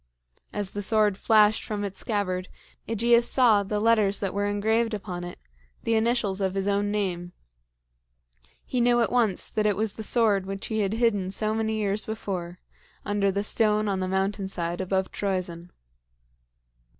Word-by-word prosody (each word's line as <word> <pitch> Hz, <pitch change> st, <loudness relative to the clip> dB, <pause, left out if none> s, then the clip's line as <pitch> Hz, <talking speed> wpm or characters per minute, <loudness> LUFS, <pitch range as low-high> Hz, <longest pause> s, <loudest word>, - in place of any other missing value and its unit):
As 205 Hz, -2 st, -2 dB
the 205 Hz, -, -4 dB
sword 210 Hz, -1 st, +2 dB
flashed 215 Hz, +1 st, +4 dB
from 210 Hz, -1 st, -4 dB
its 195 Hz, -1 st, -5 dB
scabbard, 185 Hz, -4 st, -2 dB, 0.4 s
AEgeus 235 Hz, +2 st, +3 dB
saw 235 Hz, -6 st, +4 dB
the 205 Hz, +1 st, -2 dB
letters 215 Hz, -2 st, +3 dB
that 195 Hz, -2 st, -3 dB
were 205 Hz, +1 st, 0 dB
engraved 220 Hz, +2 st, +1 dB
upon 185 Hz, -4 st, -6 dB
it 175 Hz, -, -8 dB, 0.5 s
the 230 Hz, -, 0 dB
initials 220 Hz, -3 st, +1 dB
of 190 Hz, 0 st, -1 dB
his 195 Hz, 0 st, -1 dB
own 205 Hz, 0 st, +1 dB
name. 180 Hz, -4 st, -2 dB, 1.3 s
He 250 Hz, -, -1 dB
knew 240 Hz, 0 st, +4 dB
at 230 Hz, -, +1 dB
once 230 Hz, -6 st, +1 dB
that 215 Hz, -1 st, +1 dB
it 205 Hz, -, +2 dB
was 215 Hz, -1 st, 0 dB
the -, -, -8 dB
sword 210 Hz, -4 st, +2 dB
which 195 Hz, 0 st, -5 dB
he 220 Hz, -1 st, -2 dB
had 200 Hz, -1 st, 0 dB
hidden 220 Hz, -5 st, +1 dB
so 215 Hz, +2 st, 0 dB
many 220 Hz, 0 st, -1 dB
years 210 Hz, -1 st, -1 dB
before 185 Hz, -5 st, -4 dB, 0.5 s
under 205 Hz, -1 st, +1 dB
the 200 Hz, +1 st, -1 dB
stone 215 Hz, 0 st, +1 dB
on 195 Hz, -2 st, -1 dB
the 185 Hz, -, -2 dB
mountain 195 Hz, +1 st, -1 dB
side 175 Hz, -1 st, -3 dB
above 190 Hz, 0 st, -1 dB
Troezen. 180 Hz, -3 st, -3 dB
205 Hz, 170 wpm, -26 LUFS, 190-220 Hz, 1.3 s, flashed